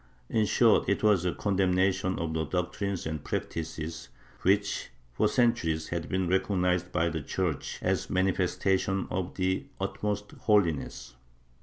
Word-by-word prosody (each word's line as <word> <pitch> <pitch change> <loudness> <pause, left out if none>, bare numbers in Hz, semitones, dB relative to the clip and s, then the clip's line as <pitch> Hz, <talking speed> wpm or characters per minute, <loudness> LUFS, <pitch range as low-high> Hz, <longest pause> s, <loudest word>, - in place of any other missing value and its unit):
In 110 -2 +2
short, 115 0 +4
it 100 - +1
was 100 -5 +4
a 90 - +2
condemnation 95 -1 +1
of 85 -2 -2
the 80 0 0
doctrines 90 +3 -2
and 80 -2 -4
practices 80 0 -4 0.3
which, 100 +2 +1 0.2
for - - +2
centuries, 85 -11 +1
had 85 -1 -3
been 95 -2 0
recognized 90 -1 +1
by 85 -1 +1
the 80 -1 -3
Church 85 0 -2
as - - 0
mani 95 +1 +2
festations 95 +1 0
of 95 -1 -3
the 95 +8 0
utmost 100 +1 -2
holiness. 85 - 0
95 Hz, 140 wpm, -29 LUFS, 85-100 Hz, 0.3 s, short